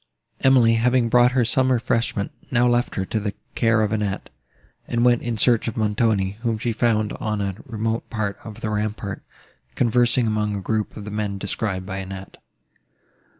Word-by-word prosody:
Emily, 125 Hz, -4 st, +5 dB
having 125 Hz, -1 st, +3 dB
brought 120 Hz, +1 st, +5 dB
her 125 Hz, -2 st, +3 dB
some 130 Hz, +2 st, +2 dB
refreshment, 115 Hz, -4 st, 0 dB, 0.2 s
now 120 Hz, 0 st, +3 dB
left 120 Hz, 0 st, +1 dB
her 95 Hz, -, -1 dB
to 110 Hz, -, -2 dB
the 105 Hz, -1 st, -3 dB, 0.2 s
care 115 Hz, -2 st, +3 dB
of 105 Hz, -, 0 dB
Annette, 105 Hz, -3 st, -2 dB, 0.6 s
and 120 Hz, 0 st, +1 dB
went 120 Hz, -1 st, +4 dB
in 120 Hz, -2 st, -3 dB
search 115 Hz, +1 st, +3 dB
of 115 Hz, -, -3 dB
Montoni, 105 Hz, -2 st, +1 dB
whom 115 Hz, -2 st, 0 dB
she 115 Hz, +1 st, -1 dB
found 110 Hz, -2 st, +1 dB
on 105 Hz, -1 st, -2 dB
a 100 Hz, -1 st, -1 dB
remote 115 Hz, -1 st, -2 dB
part 105 Hz, -3 st, -3 dB
of 110 Hz, 0 st, -9 dB
the 110 Hz, -, -2 dB
rampart, 105 Hz, -1 st, -3 dB, 0.5 s
conversing 120 Hz, 0 st, +3 dB
among 105 Hz, -1 st, 0 dB
a -, -, -2 dB
group 110 Hz, +2 st, -2 dB
of 105 Hz, -, -7 dB
the 105 Hz, -, -6 dB
men 105 Hz, -1 st, -2 dB
described 100 Hz, -1 st, -3 dB
by 95 Hz, 0 st, -5 dB
Annette. 95 Hz, 0 st, -7 dB
110 Hz, 180 wpm, -23 LUFS, 105-120 Hz, 0.6 s, Emily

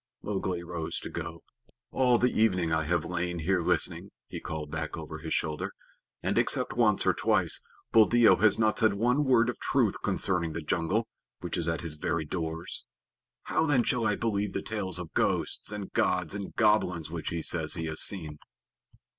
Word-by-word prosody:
Mowgli 95 Hz, -4 st, -2 dB
rose 85 Hz, -2 st, -4 dB
to -, -, -7 dB
go. -, -, -6 dB, 0.5 s
"All 125 Hz, -2 st, +3 dB
the 125 Hz, +1 st, +2 dB
evening 90 Hz, -7 st, +2 dB
I 80 Hz, 0 st, +1 dB
have 85 Hz, +1 st, 0 dB
lain 90 Hz, 0 st, -2 dB
here 90 Hz, +3 st, +1 dB
listening," -, -, +1 dB, 0.2 s
he -, -, -6 dB
called 75 Hz, -2 st, -6 dB
back 80 Hz, 0 st, -4 dB
over 80 Hz, -1 st, -7 dB
his 80 Hz, 0 st, -7 dB
shoulder, 75 Hz, -1 st, -2 dB, 0.5 s
"and, -, -, +1 dB
except -, -, +1 dB
once 110 Hz, -4 st, +2 dB
or -, -, +4 dB
twice, -, -, +2 dB, 0.3 s
Buldeo 115 Hz, +1 st, +6 dB
has 105 Hz, -1 st, +4 dB
not 110 Hz, -1 st, +2 dB
said 110 Hz, -3 st, +3 dB
one 125 Hz, +7 st, +2 dB
word 120 Hz, -3 st, +4 dB
of 125 Hz, -, -3 dB
truth -, -, +1 dB
concerning 85 Hz, -4 st, 0 dB
the 85 Hz, -, -4 dB
jungle, 90 Hz, +8 st, 0 dB, 0.3 s
which 85 Hz, -2 st, -4 dB
is 85 Hz, -2 st, -2 dB
at 85 Hz, 0 st, -1 dB
his 80 Hz, -3 st, -4 dB
very 80 Hz, +1 st, -1 dB
doors. 80 Hz, +1 st, -5 dB, 0.6 s
How, 160 Hz, -, 0 dB
then, 135 Hz, -5 st, +3 dB
shall 115 Hz, -2 st, +1 dB
I 105 Hz, -, +2 dB
believe 105 Hz, -3 st, -1 dB
the 100 Hz, -, -3 dB
tales 95 Hz, -5 st, -2 dB
of 90 Hz, -3 st, -7 dB
ghosts -, -, 0 dB
and 105 Hz, -2 st, -6 dB
gods -, -, +1 dB
and 100 Hz, -2 st, -6 dB
goblins 90 Hz, -7 st, +2 dB
which 85 Hz, -2 st, -4 dB
he 85 Hz, -2 st, -3 dB
says 80 Hz, -3 st, 0 dB
he 80 Hz, -2 st, -3 dB
has 80 Hz, 0 st, +1 dB
seen?" 80 Hz, -6 st, -3 dB
90 Hz, 185 wpm, -29 LUFS, 80-110 Hz, 0.6 s, Buldeo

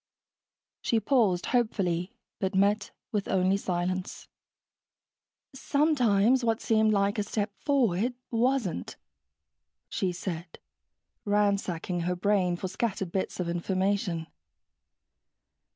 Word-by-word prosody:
She 230 Hz, -, +2 dB
paused 215 Hz, -9 st, +2 dB
hopefully, 195 Hz, -5 st, 0 dB, 0.2 s
but 190 Hz, -2 st, -1 dB
met 205 Hz, +2 st, +2 dB, 0.2 s
with 210 Hz, -3 st, -1 dB
only 190 Hz, 0 st, +2 dB
silence. 185 Hz, -1 st, -3 dB, 1.3 s
"Sometimes 260 Hz, -5 st, +3 dB
what 225 Hz, -1 st, +1 dB
seemed 220 Hz, -1 st, +3 dB
like 200 Hz, 0 st, +1 dB
a -, -, +1 dB
step 205 Hz, 0 st, -2 dB
forward 245 Hz, -5 st, +1 dB, 0.2 s
wasn't," 235 Hz, -, 0 dB, 0.9 s
she 185 Hz, -, -1 dB
said, 170 Hz, -1 st, -6 dB, 0.7 s
ransacking 200 Hz, -4 st, 0 dB
her 180 Hz, +1 st, -1 dB
brain 185 Hz, -1 st, +2 dB
for 185 Hz, -, -4 dB
scattered 195 Hz, -3 st, -2 dB
bits 190 Hz, 0 st, -2 dB
of 180 Hz, -, -1 dB
information. 185 Hz, 0 st, -1 dB
200 Hz, 100 wpm, -28 LUFS, 180-225 Hz, 1.3 s, Sometimes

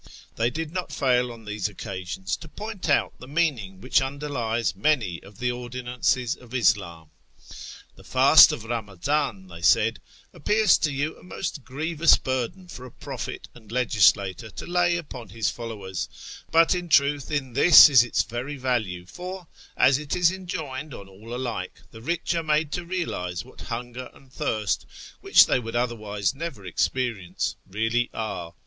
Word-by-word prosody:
They 115 Hz, +1 st, +1 dB
did 155 Hz, +3 st, -5 dB
not 180 Hz, 0 st, -4 dB
fail 125 Hz, -2 st, +1 dB
on 115 Hz, -2 st, -12 dB
these 105 Hz, -1 st, -2 dB
occasions 95 Hz, -2 st, -5 dB
to 160 Hz, -, -11 dB
point 205 Hz, +1 st, -6 dB
out 145 Hz, -, +2 dB
the 125 Hz, -, -11 dB
meaning 135 Hz, -, -1 dB
wliich 130 Hz, +1 st, +2 dB
underlies 125 Hz, -7 st, -2 dB
many 105 Hz, -, 0 dB
of 100 Hz, 0 st, -16 dB
the 125 Hz, 0 st, -1 dB
ordinances 125 Hz, 0 st, -1 dB
of 125 Hz, -, -17 dB
Ishhn. 95 Hz, -9 st, +1 dB, 0.5 s
" -, -, -13 dB
The -, -, -15 dB
fast -, -, +7 dB
of -, -, -5 dB
Kamaziiu," 110 Hz, -, -2 dB
they 85 Hz, -2 st, -11 dB
said, 115 Hz, +4 st, +3 dB, 0.2 s
" -, -, -29 dB
appears 215 Hz, 0 st, +3 dB
to 155 Hz, -2 st, 0 dB
you 145 Hz, +3 st, -2 dB
a -, -, -18 dB
most 170 Hz, -5 st, -5 dB
grievous 160 Hz, +5 st, +3 dB
burden 130 Hz, +8 st, -3 dB
for 130 Hz, -7 st, -9 dB
a -, -, -14 dB
prophet -, -, -7 dB
and 110 Hz, -3 st, -16 dB
legislator 110 Hz, -3 st, +2 dB
to -, -, -8 dB
lay 175 Hz, -1 st, +2 dB
upon 130 Hz, -8 st, -8 dB
his 110 Hz, -4 st, -1 dB
followers, 105 Hz, -6 st, -6 dB, 0.4 s
but 165 Hz, +1 st, +5 dB
in 175 Hz, -1 st, -4 dB
truth 140 Hz, -2 st, +3 dB
in 140 Hz, -5 st, -2 dB
this 160 Hz, +7 st, +9 dB
is 130 Hz, -5 st, +6 dB
its 120 Hz, -, 0 dB
very 120 Hz, +5 st, -5 dB
value, 110 Hz, -9 st, -2 dB
for, 180 Hz, -, -8 dB, 0.3 s
as 135 Hz, +1 st, +5 dB
it 150 Hz, -1 st, -3 dB
is 180 Hz, -1 st, +4 dB
enjoined 155 Hz, -7 st, -6 dB
on 100 Hz, -, -10 dB
all 100 Hz, +4 st, -13 dB
alike, 120 Hz, -7 st, -4 dB
the 110 Hz, -, -12 dB
rich 170 Hz, +7 st, -1 dB
are 165 Hz, -, 0 dB
made 155 Hz, -1 st, 0 dB
to 175 Hz, -, -3 dB
realise 90 Hz, -, -3 dB
what -, -, -15 dB
hunger 120 Hz, +1 st, -6 dB
and 135 Hz, -1 st, -20 dB
thirst, 110 Hz, -, -1 dB, 0.3 s
which -, -, +6 dB
they -, -, +1 dB
would 115 Hz, -1 st, -7 dB
otherwise 105 Hz, -5 st, -1 dB
never 135 Hz, -, -6 dB
experience, 110 Hz, +1 st, -2 dB
really 115 Hz, +4 st, 0 dB
are. 90 Hz, -7 st, -5 dB
125 Hz, 165 wpm, -25 LUFS, 110-150 Hz, 0.5 s, this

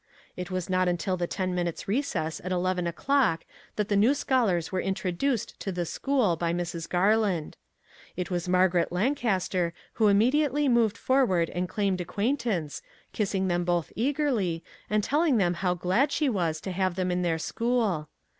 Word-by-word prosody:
It 180 Hz, 0 st, -5 dB
was 185 Hz, -2 st, -3 dB
not 185 Hz, 0 st, +1 dB
until 180 Hz, +1 st, 0 dB
the 175 Hz, -1 st, -2 dB
ten 185 Hz, 0 st, -2 dB
minutes' 175 Hz, -2 st, -3 dB
recess 195 Hz, -, -1 dB
at 185 Hz, -, -4 dB
eleven 180 Hz, -1 st, 0 dB
o'clock 205 Hz, -1 st, +1 dB, 0.3 s
that 210 Hz, -1 st, -1 dB
the 205 Hz, -, +1 dB
new 225 Hz, +8 st, +4 dB
scholars 215 Hz, -, +1 dB
were 185 Hz, -, 0 dB
introduced 195 Hz, +6 st, -2 dB
to 195 Hz, -, -3 dB
the 175 Hz, -1 st, -2 dB
school 250 Hz, -, +1 dB
by 170 Hz, +1 st, -1 dB
Mrs. 170 Hz, -1 st, -4 dB
Garland. 190 Hz, -3 st, +1 dB, 0.6 s
It 180 Hz, 0 st, -3 dB
was 175 Hz, 0 st, -2 dB
Mar 185 Hz, +1 st, +5 dB
garet 175 Hz, -1 st, 0 dB
Lancaster 190 Hz, -5 st, 0 dB, 0.3 s
who 215 Hz, -, +6 dB
immediately 280 Hz, +8 st, +3 dB
moved 230 Hz, -4 st, +3 dB
for 265 Hz, +1 st, +3 dB
ward 175 Hz, -8 st, +1 dB
and 180 Hz, 0 st, -2 dB
claimed 195 Hz, -3 st, 0 dB
acquaintance, 205 Hz, -, -2 dB, 0.3 s
kissing 195 Hz, -2 st, 0 dB
them 175 Hz, -1 st, +1 dB
both 175 Hz, -2 st, 0 dB
eagerly, 235 Hz, -, 0 dB, 0.3 s
and 210 Hz, 0 st, +1 dB
telling 295 Hz, 0 st, +2 dB
them 180 Hz, -4 st, +2 dB
how 180 Hz, 0 st, 0 dB
glad 190 Hz, -, +1 dB
she 295 Hz, -2 st, +1 dB
was 170 Hz, -8 st, -1 dB
to 190 Hz, -, -4 dB
have 185 Hz, -1 st, 0 dB
them 185 Hz, -1 st, -1 dB
in 180 Hz, 0 st, 0 dB
her 165 Hz, -2 st, +1 dB
school. 215 Hz, -, -1 dB
185 Hz, 175 wpm, -27 LUFS, 175-230 Hz, 0.6 s, who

